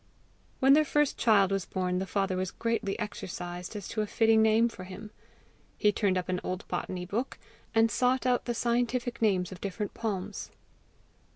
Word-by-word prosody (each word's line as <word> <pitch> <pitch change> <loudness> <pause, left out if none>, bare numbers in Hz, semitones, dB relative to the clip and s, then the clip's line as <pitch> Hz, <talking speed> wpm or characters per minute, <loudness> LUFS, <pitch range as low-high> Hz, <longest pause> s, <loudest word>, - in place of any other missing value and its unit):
When 270 +1 +6
their 310 +2 +6
first 295 -1 +1
child 200 -4 +4
was 195 -2 0
born, 180 -1 -1
the 190 - -3
father 195 0 0
was 185 0 -1
greatly 230 -3 -2
exercised 180 -3 -6
as 205 -3 -5
to 215 - -1
a 210 - -2
fitting 225 +1 +4
name 220 +1 +4
for 210 -5 -8
him. 195 +3 -9 0.7
He 210 - +4
turned 200 -3 +1
up 180 - -2
an 180 -1 -1
old 185 +2 -4
botany 180 -1 -3
book, 225 +8 -3 0.4
and 225 0 +4
sought 255 +4 +2
out 250 -1 +2
the 240 - -2
scientific 240 +1 0
names 190 -5 +2
of 185 - -9
different 200 +1 -4
palms. 205 -3 -4
210 Hz, 180 wpm, -29 LUFS, 185-230 Hz, 0.7 s, When